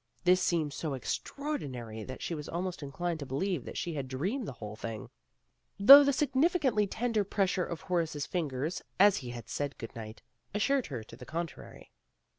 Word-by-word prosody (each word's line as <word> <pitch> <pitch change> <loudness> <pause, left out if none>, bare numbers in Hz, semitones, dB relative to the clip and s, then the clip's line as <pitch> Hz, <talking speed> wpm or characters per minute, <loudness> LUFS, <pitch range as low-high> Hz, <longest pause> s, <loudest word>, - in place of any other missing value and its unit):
This 180 +1 +5
seemed 165 -5 +1
so 150 -2 -3
extraordinary 130 - -4
that 130 +3 -7
she - - -2
was 150 -2 -5
almost 180 +1 -3
inclined 160 +4 -3
to 140 - -5
believe 145 +3 -1
that - - -7
she 170 - -2
had 140 -3 -3
dreamed 190 - -2
the - - -5
whole 105 -1 -8
thing, 110 0 -6 0.7
though 275 +8 +11
the 280 - +3
significantly 270 - +2
tender 225 0 0
pressure 190 -2 0
of 170 - -5
Horace's 165 -5 -1
fingers, 155 -1 -2 0.2
as 200 0 +7
he 125 -3 -5
said 145 -1 -3
good 115 - -8
night, 110 -1 -8 0.3
assured 270 +5 +2
her 125 -7 -5
to - - -13
the 125 - -11
contrary. 165 -3 -6
170 Hz, 175 wpm, -31 LUFS, 135-205 Hz, 0.7 s, though